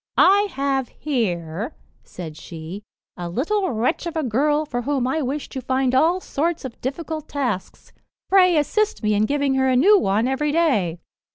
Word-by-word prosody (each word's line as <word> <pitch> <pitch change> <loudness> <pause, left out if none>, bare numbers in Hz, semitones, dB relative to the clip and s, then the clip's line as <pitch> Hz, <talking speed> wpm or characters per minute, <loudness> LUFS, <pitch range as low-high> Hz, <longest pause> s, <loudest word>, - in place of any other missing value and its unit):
"I 400 +3 +5
have 270 -1 0
here," 205 - -3 0.3
said 160 -4 -8
she, 165 +4 -8 0.3
"a 175 -1 -5
little 370 - 0
wretch 245 +9 -1
of 335 - -5
a 315 - 0
girl 295 +5 +1
for 245 -4 -3
whom 270 0 0
I 310 +5 0
wish 280 +2 -3
to 265 - -5
find 260 0 0
all 325 +7 +3
sorts 330 -2 -2
of 250 - -8
difficult 310 +3 -4
tasks; 245 -10 -4 0.3
pray 365 -3 +5
assist 425 - 0
me 215 0 +2
in 210 +1 +2
giving 280 -1 +1
her 265 0 +2
a 255 - +3
new 395 +11 +6
one 210 - +1
every 280 +3 0
day." 245 - +1
270 Hz, 175 wpm, -22 LUFS, 225-315 Hz, 0.3 s, new